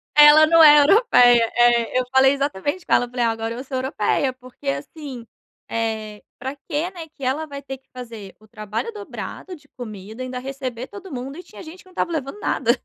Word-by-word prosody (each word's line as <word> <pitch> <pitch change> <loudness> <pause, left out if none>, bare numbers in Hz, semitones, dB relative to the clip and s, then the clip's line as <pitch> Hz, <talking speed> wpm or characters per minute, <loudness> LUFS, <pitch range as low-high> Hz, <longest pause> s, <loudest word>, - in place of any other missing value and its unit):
Ela 295 +1 +9
não 330 0 +6
é 295 -1 +9
europeia, 245 - +5
eh, 240 0 +3
eu - - 0
falei 265 +1 +5
exatamente 285 - -2
com - - 0
ela, 245 - +3
falei: 245 -1 -2
"Ah, 230 - +2
agora 225 0 -4
eu 250 - -6
sou 265 -1 -5
europeia." 260 +1 0
Porque, 255 -1 -14
assim, 245 - -6 0.4
eh, 220 -2 -3 0.2
pra 265 +3 -5
que, 310 +4 -3
né, 340 -4 -9
que 280 - -12
ela 270 +5 -1
vai 280 -2 -8
ter 270 -1 -7
que 265 - -38
fazer 230 -6 -9
o 215 - -20
trabalho 215 - -5
dobrado 400 -2 -8
de 290 -2 -20
comida 215 0 -8
e - - -4
ainda 255 0 -5
receber 260 -2 -6
todo 390 -3 -11
mundo, 270 +4 -6
e 360 - -9
tinha 210 -11 -13
gente 325 +4 -11
que - - -41
não 370 - -18
estava 340 - -2
levando 310 +5 -4
nada. - - +1
260 Hz, 215 wpm, -22 LUFS, 230-295 Hz, 0.4 s, Ela